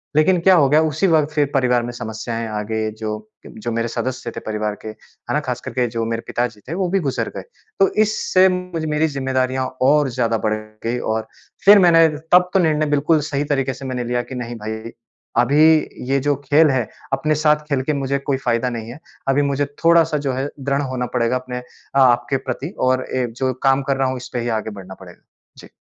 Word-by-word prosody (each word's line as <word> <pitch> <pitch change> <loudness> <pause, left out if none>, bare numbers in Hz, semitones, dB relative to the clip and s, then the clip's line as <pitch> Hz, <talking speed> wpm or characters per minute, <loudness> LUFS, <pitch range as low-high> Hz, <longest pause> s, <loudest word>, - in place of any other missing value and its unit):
लेकिन 175 +4 +4
क्या 190 +1 +6
हो 145 -5 +5
गया 155 +2 +5
उसी 160 +5 +1
वक़्त 155 -2 +2
फिर 150 -2 +2
परिवार 125 -3 +2
में 120 - -4
समस्याएँ 115 0 -5
आ 105 -1 -3
गई। 110 0 -1
जो, 110 0 -6 0.2
जो 115 +2 -6
मेरे 115 +1 -1
सदस्य 125 0 -4
थे - - -4
परिवार 105 -1 -2
के, - - -9
है 110 0 -9
ना? 150 - +2
ख़ासकर 125 -4 -5
के 125 -1 +1
जो 115 0 -3
मेरे 115 0 -2
पिताजी 120 -3 -2
थे, 160 - -4
वो 185 0 -1
भी 195 +2 +2
गुज़र 140 -6 -2
गए। - - -4 0.4
तो 195 - +6 0.2
इससे 190 -3 +3
मेरी 160 -4 -1
जिम्मेदारियाँ 130 -2 -1 0.2
और 145 +1 +4
ज़्यादा 115 -2 0
बढ़ 110 - +2 0.3
गई 120 +2 0
और 110 0 -2 0.4
फिर 205 +1 +9
मैंने 165 -2 +6 0.2
तब 180 0 +6
तो 195 - +4
निर्णय 155 -3 +2
बिल्कुल 150 +2 +2
सही 140 +1 0
तरीके 135 -1 0
से 135 - -10
मैंने 125 -1 -3
लिया 120 0 -1
कि 130 - -9
नहीं, 120 -1 -5
भाई 110 +1 -6 0.5
अभी 140 +5 +3 0.5
ये 135 0 +2
जो 145 +1 +1
खेल 150 +2 +5
है, 125 -5 0 0.3
अपने 155 +3 +1
साथ 150 0 +4
खेल 135 -2 +1
के 150 - 0
मुझे 140 0 -1
कोई 140 -1 -1
फ़ायदा 120 -1 0
नहीं 115 -2 -6
है। 140 - -10 0.3
अभी 135 +1 +3
मुझे 140 0 0 0.2
थोड़ा-सा 165 -2 +4
जो 130 - 0
है 135 +3 -2
दृढ़ 140 +1 0
होना 130 -2 -3
पड़ेगा 120 0 +1
अपने 125 -1 -6
अ, 130 +2 -6
आपके 120 0 +3
प्रति 130 +5 -5 0.2
और 130 0 +1 0.2
एक 120 -2 -2
जो 130 -1 +1
काम 135 0 +4
कर 135 - +2
रहा 135 -1 +1
हूँ, 130 - -3
इस 125 +1 -9
पे 125 - -1
ही 120 - -2
आगे 110 - -6
बढ़ना 95 -2 -10
पड़ेगा। 90 -2 -14 0.4
जी। - - -13
130 Hz, 220 wpm, -20 LUFS, 120-150 Hz, 0.5 s, फिर